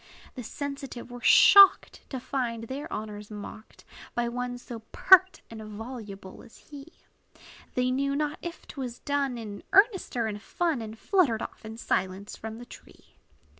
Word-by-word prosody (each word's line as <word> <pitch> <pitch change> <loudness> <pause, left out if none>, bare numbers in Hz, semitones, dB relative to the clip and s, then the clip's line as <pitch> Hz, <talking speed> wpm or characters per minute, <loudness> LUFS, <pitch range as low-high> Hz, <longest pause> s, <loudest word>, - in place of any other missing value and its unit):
The 255 - -7
sensitive 275 -1 -7
were 245 0 -9
shocked, 395 +7 +7
To 260 - -4
find 245 -3 -3
their 265 +5 -6
honors 210 -1 -6
mocked 210 +1 -10 0.3
By 240 0 0
one 245 +1 -4
so 240 -1 -9
pert 375 0 +5
and 225 -1 -8
voluble 210 -3 -9
as - - -16
he; 285 -1 -12 0.9
They 250 0 +1
knew 275 +2 0
not 300 +1 -2
if 345 -1 -8
't - - -13
was 245 -2 -5
done 280 -3 -1
In 210 -3 -7
earnest 395 - +3
or 230 - +1
in 210 -1 -4
fun; 320 +3 -2
And 220 0 -8
fluttered 295 - +1
off - - -9
in 220 +1 -8
silence 190 -2 -2
from 220 0 -8
the 240 - -10
tree. - - -16
245 Hz, 165 wpm, -27 LUFS, 220-280 Hz, 0.9 s, shocked